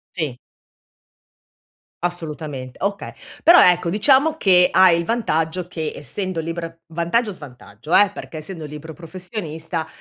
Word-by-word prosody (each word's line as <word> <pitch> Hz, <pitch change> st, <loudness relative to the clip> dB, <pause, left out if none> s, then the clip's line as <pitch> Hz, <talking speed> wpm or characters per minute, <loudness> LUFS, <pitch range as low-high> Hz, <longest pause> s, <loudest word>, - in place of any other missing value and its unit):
Sì. 150 Hz, -8 st, -3 dB, 1.7 s
Assolutamente, 150 Hz, -7 st, -5 dB
okay, 200 Hz, 0 st, -3 dB, 0.3 s
però 345 Hz, +2 st, +8 dB
ecco, 175 Hz, -1 st, +3 dB
diciamo 270 Hz, -, +3 dB
che 180 Hz, -, +5 dB
hai 185 Hz, -3 st, +5 dB
il 170 Hz, -, -3 dB
vantaggio 175 Hz, -6 st, -1 dB
che 160 Hz, -3 st, -4 dB
essendo 185 Hz, +5 st, -4 dB
liber 165 Hz, 0 st, -5 dB
vantaggio, 170 Hz, +8 st, 0 dB
svantaggio 145 Hz, -, -6 dB
eh, 205 Hz, -1 st, +5 dB
perché 165 Hz, -, -9 dB
essendo 160 Hz, +1 st, -7 dB
libero 150 Hz, +2 st, -9 dB
professionista, 165 Hz, -2 st, -5 dB
170 Hz, 120 wpm, -21 LUFS, 155-190 Hz, 1.7 s, però